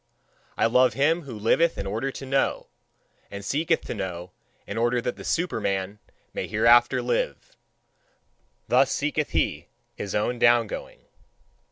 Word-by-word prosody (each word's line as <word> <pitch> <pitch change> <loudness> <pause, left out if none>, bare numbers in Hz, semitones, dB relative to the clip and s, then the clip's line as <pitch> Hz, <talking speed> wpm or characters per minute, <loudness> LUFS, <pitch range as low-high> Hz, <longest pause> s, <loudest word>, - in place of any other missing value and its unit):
I - - +3
love 125 +3 +4
him 160 +5 +2
who 120 -5 -7
liveth 160 +10 +2
in - - -4
order 110 +8 -2
to 135 - -8
know, 135 +1 0 0.6
and 100 0 -8
seeketh 150 +9 +1
to - - -6
know 90 -4 -5 0.3
in 100 - -6
order 120 +2 +1
that 120 +1 -3
the - - -10
Superman 100 - -2 0.3
may - - -3
hereafter 120 +4 +4
live. 120 - -2 1.1
Thus 130 +2 +3
seeketh 150 +1 -1
he - - -1 0.3
his 100 - -5
own 120 +4 0
down 120 -1 +5
going. - - -8
120 Hz, 145 wpm, -25 LUFS, 105-135 Hz, 1.1 s, down